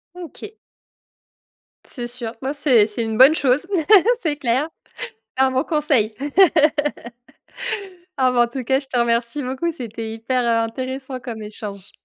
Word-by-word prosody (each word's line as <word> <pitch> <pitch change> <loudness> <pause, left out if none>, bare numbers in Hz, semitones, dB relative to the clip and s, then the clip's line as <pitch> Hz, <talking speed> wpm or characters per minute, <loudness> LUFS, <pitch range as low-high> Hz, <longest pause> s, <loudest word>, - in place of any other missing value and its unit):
OK. 360 +5 -10 1.3
C'est 240 -3 -6
sûr. 240 -2 -5
Ouais 270 +2 -2
c'est 255 -7 +4
c'est 225 +2 -3
une 220 -1 -3
bonne 275 +5 +7
chose. 275 +3 +1 0.6
C'est 295 -4 -1
clair. 265 +4 0 0.7
Un 265 0 +3
bon 260 +3 +1
conseil. 285 -10 +1 2.0
Ah 255 -1 +4
bah 240 -1 +3
en - - 0
tout 255 +1 -5
cas, 265 +3 +2
je 275 - -4
te 250 - -2
remercie 235 +4 0
beaucoup, 265 +7 -2
c'était 225 -6 -6
hyper 235 +3 -1
in 230 -1 +2
intéressant 260 +2 -5
comme 230 -3 -7
échange. 205 -2 -7
255 Hz, 145 wpm, -21 LUFS, 230-275 Hz, 2.0 s, bonne